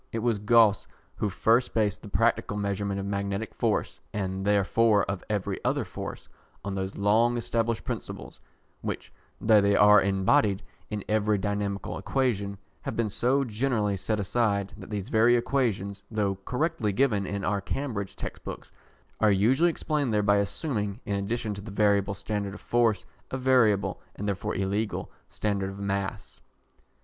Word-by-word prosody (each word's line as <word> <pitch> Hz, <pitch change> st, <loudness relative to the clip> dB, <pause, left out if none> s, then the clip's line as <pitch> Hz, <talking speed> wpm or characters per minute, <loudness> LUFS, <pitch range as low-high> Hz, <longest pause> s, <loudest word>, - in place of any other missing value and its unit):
It -, -, -3 dB
was 115 Hz, -4 st, +2 dB
Gauss 110 Hz, -1 st, +4 dB, 0.3 s
who 105 Hz, -, -1 dB
first 115 Hz, +5 st, +2 dB
based 105 Hz, -4 st, +1 dB
the -, -, -10 dB
practical 115 Hz, -1 st, +1 dB
measurement 100 Hz, -1 st, -1 dB
of 100 Hz, -, -4 dB
magnetic 100 Hz, +1 st, -2 dB
force -, -, -1 dB, 0.2 s
(and 95 Hz, -1 st, -2 dB
therefore 105 Hz, +1 st, +3 dB
of 100 Hz, -2 st, -3 dB
every 105 Hz, -3 st, -2 dB
other -, -, 0 dB
force) -, -, -7 dB, 0.4 s
on 100 Hz, -, -2 dB
those 95 Hz, 0 st, -4 dB
long 115 Hz, +4 st, +3 dB
established 115 Hz, -1 st, -1 dB
principles, -, -, -6 dB, 0.4 s
which, -, -, -5 dB, 0.3 s
though 110 Hz, -1 st, +5 dB
they 100 Hz, 0 st, +3 dB
are 105 Hz, 0 st, +7 dB
embodied 100 Hz, +1 st, +2 dB, 0.3 s
in 105 Hz, -2 st, -4 dB
every 105 Hz, -1 st, +2 dB
dynamical 100 Hz, 0 st, -2 dB
equation, 105 Hz, -7 st, -1 dB, 0.2 s
have -, -, -4 dB
been 115 Hz, -3 st, 0 dB
so 130 Hz, +6 st, +2 dB
generally 110 Hz, -3 st, 0 dB
set 105 Hz, +3 st, -1 dB
aside, 100 Hz, -1 st, 0 dB
that -, -, -11 dB
these 100 Hz, -3 st, -4 dB
very 115 Hz, +2 st, +5 dB
equations, 110 Hz, -6 st, -1 dB
though 105 Hz, -3 st, 0 dB
correctly 125 Hz, -5 st, 0 dB
given 105 Hz, -3 st, +1 dB
in 100 Hz, -1 st, -3 dB
our 100 Hz, +1 st, 0 dB
Cambridge 100 Hz, -5 st, -3 dB
textbooks, -, -, -7 dB, 0.5 s
are 110 Hz, -, +4 dB
usually 120 Hz, -, +4 dB
explained 150 Hz, -5 st, -1 dB
there 105 Hz, -1 st, +2 dB
by 100 Hz, 0 st, +4 dB
assuming, 105 Hz, 0 st, -2 dB
in 105 Hz, -, -2 dB
addition 105 Hz, +2 st, -2 dB
to 100 Hz, -, -7 dB
the 110 Hz, -, -9 dB
variable 100 Hz, -1 st, +2 dB
standard 100 Hz, 0 st, -3 dB
of -, -, -11 dB
force, 115 Hz, -3 st, +1 dB, 0.2 s
a 130 Hz, -, -3 dB
variable, 125 Hz, -6 st, +3 dB
and 105 Hz, -, -4 dB
therefore 100 Hz, -1 st, -2 dB
illegal, 100 Hz, +3 st, -2 dB, 0.2 s
standard 100 Hz, -2 st, -1 dB
of 95 Hz, -, -8 dB
mass. 100 Hz, +1 st, -4 dB
105 Hz, 160 wpm, -27 LUFS, 100-115 Hz, 0.5 s, are